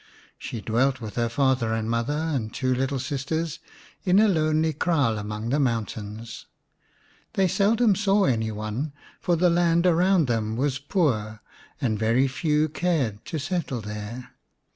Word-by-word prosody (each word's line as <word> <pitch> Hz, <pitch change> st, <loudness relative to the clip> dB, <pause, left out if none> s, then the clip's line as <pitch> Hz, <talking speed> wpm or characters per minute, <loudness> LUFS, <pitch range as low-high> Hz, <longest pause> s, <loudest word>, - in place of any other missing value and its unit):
She 115 Hz, -, -6 dB
dwelt 125 Hz, +5 st, +1 dB
with 110 Hz, -3 st, -7 dB
her 115 Hz, -1 st, 0 dB
father 130 Hz, -2 st, +1 dB
and 110 Hz, -1 st, -2 dB
mother 115 Hz, +5 st, 0 dB
and 145 Hz, -9 st, -2 dB
two 130 Hz, +1 st, 0 dB
little 135 Hz, +2 st, -1 dB
sisters 145 Hz, +4 st, -3 dB, 0.4 s
in 185 Hz, 0 st, +3 dB
a 215 Hz, +1 st, +6 dB
lonely 155 Hz, -3 st, +2 dB
kraal 140 Hz, -9 st, +1 dB
among 105 Hz, +2 st, -4 dB
the 140 Hz, +4 st, +1 dB
mountains. 110 Hz, -3 st, -3 dB, 0.9 s
They 190 Hz, -1 st, +3 dB
seldom 215 Hz, +4 st, +3 dB
saw 200 Hz, 0 st, +2 dB
any 110 Hz, -8 st, +1 dB
one, 110 Hz, +8 st, -4 dB, 0.3 s
for 175 Hz, -, +1 dB
the 175 Hz, +1 st, +3 dB
land 170 Hz, 0 st, +3 dB
around 180 Hz, 0 st, +4 dB
them 110 Hz, -3 st, -1 dB
was 130 Hz, 0 st, 0 dB
poor 120 Hz, -, -1 dB, 0.4 s
and 115 Hz, -7 st, 0 dB
very 115 Hz, +5 st, +3 dB
few 150 Hz, +2 st, +1 dB
cared 150 Hz, -, -1 dB
to 160 Hz, -, -4 dB
settle 155 Hz, -5 st, -2 dB
there. 105 Hz, +4 st, -7 dB
135 Hz, 150 wpm, -25 LUFS, 115-165 Hz, 0.9 s, a